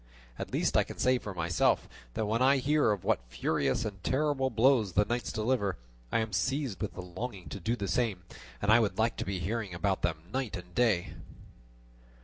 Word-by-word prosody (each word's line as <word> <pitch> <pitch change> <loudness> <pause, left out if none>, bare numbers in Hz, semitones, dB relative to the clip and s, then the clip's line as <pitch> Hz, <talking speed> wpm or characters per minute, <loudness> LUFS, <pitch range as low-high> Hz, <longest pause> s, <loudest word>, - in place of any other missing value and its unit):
At - - -5
least - - 0
I - - +5
can - - -9
say 130 0 +3
for 100 -5 -7
myself 85 0 +2 0.3
that 110 - 0
when 110 +3 0
I 135 +2 +5
hear 145 -2 +3
of 100 -4 -2
what - - +2
furious 70 - 0
and 100 -4 -6
terrible 135 -1 +1
blows 115 -4 +3
the 105 - +4
knights 120 +2 -2
deliver, 110 - 0 0.3
I - - +2
am 110 -2 -4
seized 135 -1 -1
with 105 - -3
the 90 - -6
longing 90 -1 -6
to 100 - -6
do 115 +7 0
the 100 -4 -3
same, 105 -7 0 0.4
and 105 - +4
I 115 - +7
would 110 -3 0
like 110 +1 +2
to - - -2
be 95 0 -2
hearing 100 0 -3
about 95 +2 0
them 80 -2 -1
night 130 -6 -2
and 90 0 -11
day." 110 -7 +2
110 Hz, 205 wpm, -30 LUFS, 95-125 Hz, 0.4 s, I